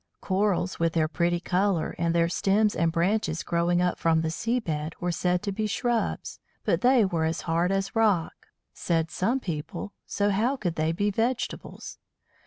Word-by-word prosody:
Corals, 190 -1 0
with 165 -1 +1
their 160 -2 +2
pretty 170 +2 0
colour, 185 -1 0
and 170 0 +1
their 170 0 +3
stems 205 +4 +2
and 165 0 +1
branches 170 0 0
growing 175 +1 +1
up 180 - 0
from 160 -1 +2
the 160 0 -1
sea 230 +8 0
bed, 155 -6 -4
were 175 0 -1
said 180 +2 0
to 205 - -2
be 215 +2 -2
shrubs, 235 +2 -1 0.3
but - - +1
they 250 -3 +5
were 170 -4 -1
as 160 +1 -1
hard 170 +2 0
as 195 +4 -1
rock, 210 -7 +1 0.3
said 165 -2 -1
some 235 +8 0
people, 165 - -5
so 205 0 +1
how 230 +7 +1
could 180 -8 -2
they 155 0 0
be 205 +5 0
vegetables? 235 +4 -3
180 Hz, 180 wpm, -27 LUFS, 165-210 Hz, 0.3 s, they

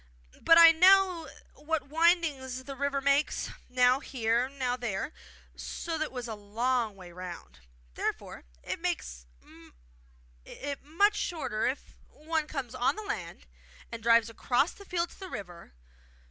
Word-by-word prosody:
But 330 - +6
I 335 -1 +10
know 365 -1 +5 0.2
what 300 -3 -3
windings 305 -6 +1
the 275 0 -7
river 280 0 -1
makes, 280 +2 +1 0.2
now 250 +1 +4
here, 240 -1 0
now 260 -3 -2
there, 240 +2 -4 0.4
so 335 - -5
that 315 - -2
it 260 - -9
is 245 -1 -4
a 225 - -4
long 220 +2 -1
way 180 -2 -12
round. 175 - -9 0.3
Therefore - - -4 0.2
it - - -4
makes - - -4 1.2
it 280 - -6
much 400 +8 +2
shorter 245 -11 -2
if 265 - -5
one 315 0 -3
comes 265 -6 -5
on 255 -1 +1
the 430 - -6
land 410 +1 -6 0.5
and 230 -1 -6
drives 230 0 +4
across 245 +6 +1
the 400 - -14
field 345 -2 -2
to - - -17
the 380 -1 -8
river. 175 - -8
270 Hz, 145 wpm, -29 LUFS, 230-325 Hz, 1.2 s, I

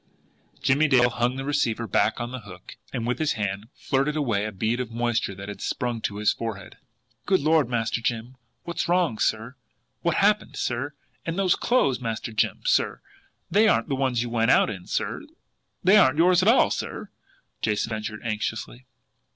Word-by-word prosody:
Jimmie 145 +4 +3
Dale 125 -3 +4
hung 120 +2 0
the 135 0 -5
receiver 140 -6 0
back 110 +1 +1
on 120 +1 -4
the 130 - -5
hook 95 -5 -12 0.2
and 115 - -3
with 125 +1 -1
his 155 -2 +1
hand 100 -1 -3
flirted 140 +2 0
away 115 -9 0
a 110 - -3
bead 110 +5 -1
of 125 -3 -3
moisture 115 -3 -1
that 100 +1 -8
had 100 -2 -7
sprung 120 -2 -2
to 100 - -3
his 105 0 +2
forehead. 105 -4 -6 0.5
"Good 190 0 +4
Lord, 155 -3 +3
Master 115 -1 -1
Jim, 120 +2 -3 0.3
what's 170 - -3
wrong, 175 -10 +2
sir? 110 +4 -1 0.4
What's 170 - 0
happened, 210 +1 +2
sir? 135 +4 -3 0.3
And - - -16
and - - -7
those 190 -2 +3
clothes, 140 - +1
Master 115 -1 -4
Jim, - - 0
sir! - - +2 0.5
They 210 +5 +5
aren't 210 - +2
the 135 - 0
ones 130 -3 0
you 120 - -6
went 115 0 +2
out - - +4
in, 90 -4 -9
sir - - -2 0.6
they 190 +4 +6
aren't 150 -8 +5
yours 180 +2 +5
at 185 - +1
all, 245 - +5
sir!" - - -5 0.5
Jason 105 +1 0
ventured 110 0 -4
anxiously. 110 +3 -4
120 Hz, 185 wpm, -25 LUFS, 110-145 Hz, 0.6 s, they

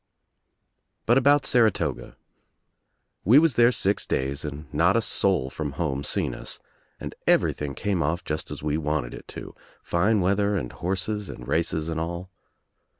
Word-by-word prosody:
But 120 +3 +5
about 140 +2 +4
Saratoga. 115 -5 +1 1.1
We 115 +9 +6
was 160 -2 +5
there 120 +1 +5
six 100 -4 -1
days 70 +2 -1
and 75 0 -6
not 85 +8 +3
a - - +4
soul 90 -12 +1
from 75 -3 -4
home 70 -3 -2
seen - - -1
us - - -8 0.4
and - - -6
everything 70 -2 +2
came 100 -4 -1
off 80 +4 -1
just 75 +1 -4
as - - -7
we 75 +1 0
wanted 75 -5 -2
it - - -10
to, - - -9 0.3
fine 100 +5 +2
weather 100 +2 +1
and 65 -9 -4
horses 95 +3 -2
and - - -9
races 80 +1 0
and 80 -1 -2
all. 85 +3 -5
85 Hz, 155 wpm, -25 LUFS, 75-105 Hz, 1.1 s, We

